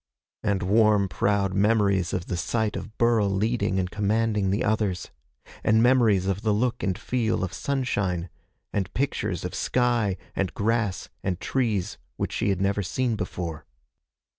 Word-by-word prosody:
and 100 -3 0
warm, 105 0 +4
proud 100 0 +1
memories 100 -3 +2
of 90 -2 -2
the 90 - -3
sight 105 +5 -1
of 110 +2 -7
Burl 115 -4 +3
leading 105 +1 0
and 90 -1 -1
commanding 105 -1 +1
the 100 +5 +1
others, 105 -4 -1 0.5
and 110 +1 +4
memories 115 -7 +4
of 95 0 -1
the 110 -2 +1
look 120 +3 0
and 95 -1 -1
feel 115 -5 -1
of 90 - -3
sunshine, 100 -11 -1 0.5
and 95 -2 -1
pictures 105 - -1
of 90 - -4
sky 120 -6 +1 0.2
and 95 - -1
grass 110 -2 0
and 90 -2 -2
trees 110 -9 -1 0.2
which - - -2
she - - 0
had 95 -2 0
never 100 +1 +1
seen 120 +5 -1
before. 85 -5 -4
100 Hz, 155 wpm, -26 LUFS, 95-115 Hz, 0.5 s, warm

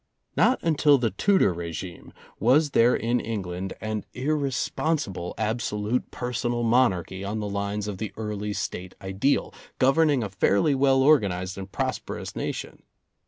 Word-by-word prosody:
Not 260 - +4
until 150 -3 +4
the 120 -4 0
Tudor 190 - +3
regime 85 +1 -7 0.3
was 140 +7 +4
there 120 0 +4
in 120 +2 0
Eng 110 -3 -3
land 90 +2 -5
an 110 -1 -3
irresponsible 140 - -1
absolute 110 +1 -1
personal 120 -1 -2
monarchy 100 -6 +2
on 105 +2 -3
the 105 - -3
lines 100 +1 -2
of 100 -3 -5
the 110 -1 -4
early 105 -1 -3
State 90 -1 -5
ideal, 95 +9 0 0.2
governing 140 0 +3
a 105 - -3
fairly 100 +8 +2
well 135 -1 +3
organized 100 -11 +3
and 95 0 -8
prosperous - - -4
nation. - - -5
110 Hz, 140 wpm, -26 LUFS, 100-130 Hz, 0.3 s, Not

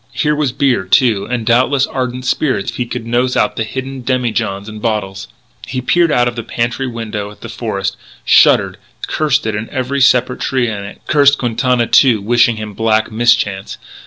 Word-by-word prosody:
Here 150 -1 0
was 150 -4 0
beer, 130 -6 0
too; 105 0 +2
and 120 -2 -2
doubtless 130 +4 +2
ardent 125 -1 -4
spirits 130 -7 0
if - - -10
he 125 - -2
could 115 -1 -5
nose 120 +2 0
out 105 - +1
the 115 - -1
hidden 130 +3 -6
demijohns 115 -6 -2
and 110 -1 -9
bottles. 100 -4 -3 0.4
He 130 - -3
peered 165 +6 +2
out 120 -3 +2
of 120 - -3
the 115 - -3
pantry 120 +3 -2
window 110 -4 -5
at 105 - -16
the 115 - -8
forest, 100 -4 -3 0.3
shuddered, - - +4 0.3
cursed 150 -6 0
it 110 - -1
and 105 +2 -4
every 135 +1 -2
separate 125 -1 +3
tree 130 -3 0
in 105 -3 -4
it; 100 - -11
cursed 145 -1 +4
Quintana, 120 0 0
too, 120 0 +4
wishing 120 +3 +2
him 110 -1 -7
black 110 +1 0
mischance. 110 -4 0
120 Hz, 190 wpm, -15 LUFS, 110-130 Hz, 0.4 s, shuddered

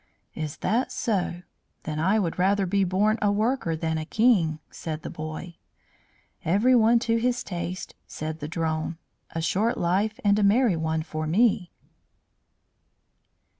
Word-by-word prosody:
"Is 155 -2 -5
that 240 +4 +1
so? 180 -5 -1 0.4
Then 155 0 -4
I 190 +7 +3
would 180 -5 -1
rather 195 +2 +3
be 195 +2 +1
born 205 +4 +2
a 205 -1 +3
worker 215 -4 0
than 160 0 -1
a - - -3
king," 190 -7 +3
said 160 -1 -6
the - - -5
boy. 155 +2 -7 0.9
"Everyone 230 +5 +4
to 230 0 +2
his 245 +1 0
taste," 180 0 -5
said 155 +1 -5
the 150 - -5
drone. 160 0 -2 0.4
"A 165 - -1
short 220 +9 +1
life 200 +5 0
and 205 0 +4
a - - +2
merry 210 0 +4
one 160 0 -1
for 155 -1 -4
me." 190 0 +2
185 Hz, 145 wpm, -26 LUFS, 160-215 Hz, 0.9 s, Everyone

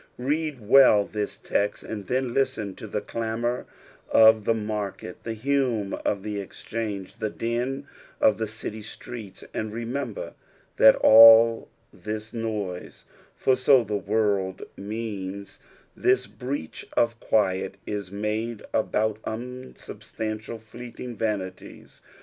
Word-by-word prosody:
Read 145 +2 -1
well 110 -5 +7
this 105 -1 -4
text, 100 0 -1
and 105 -4 -6
then 130 -1 -1
listen 130 -7 0
to 110 - -9
the 105 - -3
clamour 115 +3 -3 0.4
of 110 -1 +6
the 115 - +3
maiket, 105 -4 -4
the 115 -1 -5
hum 120 -4 0
of 100 -2 -1
the 105 -1 -3
exchange, 100 0 -5
the 110 - -2
din 125 +6 -2 0.3
of 110 0 +4
the 110 - -1
city 110 0 -6
streets, 110 -1 -9
and 110 -1 -3
remember 120 +1 -4 0.4
that 110 - +8
all 115 +1 +8 0.2
this 110 +1 -6
noise 105 -6 -4 0.3
(tor 130 - +3
so 130 0 +5
the 105 -1 -3
word 100 -2 0
means), 100 -2 -6 0.4
this 385 +1 +2
breach 125 - -6
of 115 0 +2
quiet, 95 -2 0
is 100 -3 -4
made 105 +2 -3
about 110 -1 0
unsubstantial, 115 -2 -6
fleeting 120 +2 -9
vanities. 105 -4 -5
110 Hz, 120 wpm, -25 LUFS, 105-120 Hz, 0.4 s, that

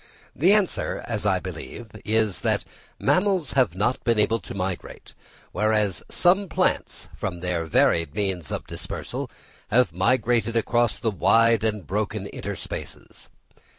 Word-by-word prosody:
The 175 +7 +4
answer, 205 -3 +1
as 105 -3 -1
I 95 -2 +3
believe, 95 +6 -8
is, 110 -4 +1
that - - 0 0.3
mammals 185 -6 +1
have 125 - +2
not 105 +6 0
been 115 -2 +2
able 110 +2 +2
to 95 - -9
migrate, 95 -1 -5 0.4
whereas 105 -2 +1
some 190 +2 +3
plants, - - -1
from 90 -2 -4
their 90 -2 -1
varied 80 -1 +2
means 95 -6 -2
of - - -3
dispersal, - - -5 0.4
have 120 -7 +3
migrated 115 +3 +1
across 120 0 +2
the 115 - -1
wide 115 +3 +4
and 105 -5 -1
broken 105 +2 -2
interspaces. - - -7
110 Hz, 135 wpm, -25 LUFS, 95-120 Hz, 0.4 s, The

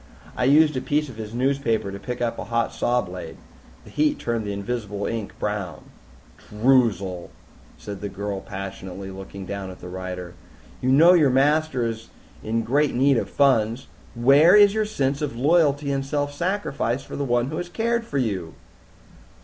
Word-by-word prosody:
"I 125 - 0
used 150 +2 +5
a 130 - -1
piece 150 +1 0
of 120 - -11
his 110 -1 -6
newspaper 120 -4 0
to 100 - -7
pick 120 +4 -4
up 115 - -2
a - - -5
hot 115 +1 -1
saw 120 0 +1
blade. 90 -3 -8 0.5
The - - -15
heat 300 -1 +1
turned 115 -2 -2
the 100 - -3
invisible 100 0 -4
ink 115 -3 -4
brown." 105 -4 -4 0.6
"Droozle," 105 -6 +1 0.5
said 100 -2 -8
the 100 - -4
girl 100 0 -4
passionately, 95 -1 -7
looking 95 0 -9
down 100 0 -5
at 90 - -11
the 90 - -9
writer, 90 -1 -6 0.5
"you 130 - +1
know 165 +6 +7
your 155 -6 +5
master 140 0 +2
is 115 0 -5 0.3
in 115 +1 -1
great 145 +5 +1
need 135 +1 +4
of - - -2
funds. 125 -3 +2 0.3
Where 140 - +6
is 205 -1 +7
your 215 0 0
sense 140 -8 -1
of 145 -5 -3
loyalty 145 +1 +2
and 135 0 -1
self 145 +1 -2
sacrifice 145 - -2
for - - -9
the 140 - -2
one 120 -1 +1
who 155 - -4
has 175 - -4
cared 230 +4 0
for 145 -11 -4
you?" 100 -10 -2
120 Hz, 180 wpm, -23 LUFS, 100-145 Hz, 0.6 s, know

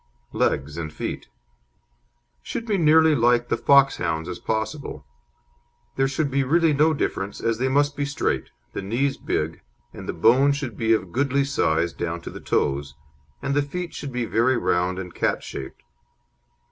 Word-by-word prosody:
LEGS 75 +3 0
AND 80 -2 -4
FEET - - -5 1.1
Should 230 - -5
be 220 - -1
as 195 - +2
nearly 160 0 +6
like 120 -1 +3
the - - +2
Foxhound's 90 - +3
as 90 -1 -5
possible. 110 - -3 0.9
There 135 - +2
should 140 +1 -1
be 135 +1 +2
really 165 +3 +3
no 155 +2 +3
difference, 100 -7 -3
as 115 -1 -1
they 130 - +1
must 145 +1 +2
be 145 - -1
straight, 145 +1 -1 0.2
the - - -3
knees 130 +8 -1
big, 80 +2 -2 0.3
and - - -9
the - - -1
bone 135 +5 +4
should 140 -6 -4
be 115 +1 +2
of 95 -5 -1
goodly 140 +3 +1
size 85 - +1
down 85 0 -3
to - - -8
the - - -9
toes, 70 0 -1 0.5
and 140 - 0
the 145 - +3
feet 175 +5 -5
should 140 - -6
be 125 -1 -2
very 120 +4 +2
round 90 -1 0
and 90 -2 -6
cat - - 0
shaped. 65 - -8
125 Hz, 170 wpm, -24 LUFS, 90-140 Hz, 1.1 s, nearly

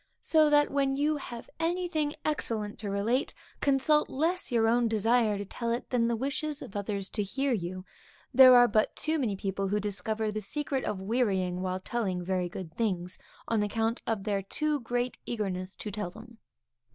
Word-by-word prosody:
So 310 -2 +4
that, 295 0 +4
when 275 -1 +1
you 295 +2 +1
have 240 -4 -8
anything 330 -3 0
excellent 220 -8 -1
to 205 - -4
relate, 215 +7 0 0.2
consult 285 +2 +3
less 330 +4 0
your 225 -2 +3
own 235 +1 +3
desire 225 0 +2
to 200 - -4
tell 235 +4 -4
it, 235 - -3
than 235 -2 +2
the 235 - +1
wishes 285 +4 -2
of 195 - -11
others 200 -1 -3
to 215 - -2
hear 270 +7 -1
you. 185 -2 -4 0.5
There 255 0 +9
are 245 0 +8
but 215 -1 +1
too 315 +1 0
many 225 -7 0
people 195 0 -2
who 205 +2 0
discover 215 +2 -2
the 215 0 -3
secret 275 +4 -1
of 205 -3 -2
wearying 190 -4 0
while 185 0 -2
telling 190 -4 -2
very 180 -1 -1
good 180 -4 -7
things, 185 -6 -1 0.3
on 225 -2 +1
account 225 +2 -1
of 220 -4 -1
their 200 -2 0
too 300 +9 -1
great 245 +1 -2
eagerness 190 -5 -3
to 210 - -6
tell 205 -2 -3
them. 225 +4 -14
225 Hz, 185 wpm, -29 LUFS, 200-270 Hz, 0.5 s, There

